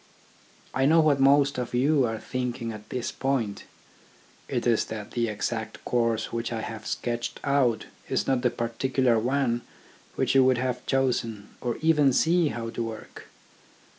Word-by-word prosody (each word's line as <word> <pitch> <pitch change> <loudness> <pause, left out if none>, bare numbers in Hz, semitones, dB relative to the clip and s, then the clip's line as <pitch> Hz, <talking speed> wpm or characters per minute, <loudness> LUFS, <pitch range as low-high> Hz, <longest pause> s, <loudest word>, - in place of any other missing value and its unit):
I 135 +1 +2
know 165 +2 +5
what 150 -3 +4
most 140 0 +4
of 125 0 -3
you 135 +1 +3
are 110 0 -3
thinking 120 0 -3
at 105 -1 -10
this 125 -2 -3
point. 130 -7 -2 0.8
It 120 - -2
is 115 -2 +3
that 110 -2 -7
the 120 -1 0
exact 110 +1 -4
course 115 -2 0
which 115 0 -2
I 115 -1 -2
have 110 0 -6
sketched 120 -1 -3
out 130 -6 +2 0.2
is - - 0
not 130 -2 +1
the 125 - +3
particular 120 +1 +1
one 125 0 0 0.5
which - - +1
you 135 -1 +6
would 130 -1 +4
have 125 0 -2
chosen, 115 -6 0
or 120 -2 -2
even 150 -4 +4
see 165 +4 +3
how 115 -4 -4
to - - -4
work. 110 -1 -8
120 Hz, 165 wpm, -26 LUFS, 115-135 Hz, 0.8 s, you